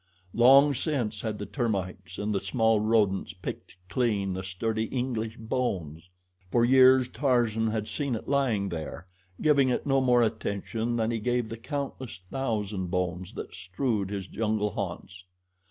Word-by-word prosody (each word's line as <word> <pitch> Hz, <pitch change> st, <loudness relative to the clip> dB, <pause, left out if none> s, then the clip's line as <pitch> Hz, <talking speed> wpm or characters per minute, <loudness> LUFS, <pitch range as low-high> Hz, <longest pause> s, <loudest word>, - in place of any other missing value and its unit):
Long 135 Hz, +5 st, +7 dB
since 120 Hz, -7 st, -2 dB
had 110 Hz, -2 st, -3 dB
the 105 Hz, -, -5 dB
termites 100 Hz, -8 st, -3 dB
and 105 Hz, +1 st, -1 dB
the 100 Hz, -, +1 dB
small 115 Hz, -3 st, +2 dB
rodents 105 Hz, -3 st, +1 dB
picked 90 Hz, -, -7 dB
clean 100 Hz, -3 st, 0 dB
the 95 Hz, -, -3 dB
sturdy 110 Hz, +4 st, -2 dB
English 115 Hz, -3 st, -3 dB
bones. 90 Hz, -, -3 dB, 0.4 s
For 120 Hz, +3 st, +3 dB
years 130 Hz, 0 st, +6 dB
Tarzan 120 Hz, -5 st, +1 dB
had 110 Hz, -1 st, -2 dB
seen 140 Hz, -5 st, -2 dB
it 110 Hz, -, -7 dB
lying 120 Hz, -8 st, +1 dB
there, 85 Hz, +1 st, -6 dB, 0.4 s
giving 140 Hz, -4 st, +4 dB
it 125 Hz, -, -1 dB
no 135 Hz, -2 st, +3 dB
more 125 Hz, -2 st, +4 dB
attention 110 Hz, +1 st, -2 dB
than 115 Hz, 0 st, 0 dB
he 115 Hz, -, -1 dB
gave 120 Hz, 0 st, 0 dB
the 115 Hz, -, -6 dB
countless 135 Hz, -, -5 dB
thousand 105 Hz, -8 st, -2 dB
bones 90 Hz, 0 st, -2 dB
that -, -, -7 dB
strewed 100 Hz, +1 st, -2 dB
his 100 Hz, -2 st, -4 dB
jungle 105 Hz, 0 st, -1 dB
haunts. 90 Hz, 0 st, -6 dB
110 Hz, 155 wpm, -28 LUFS, 100-125 Hz, 0.4 s, Long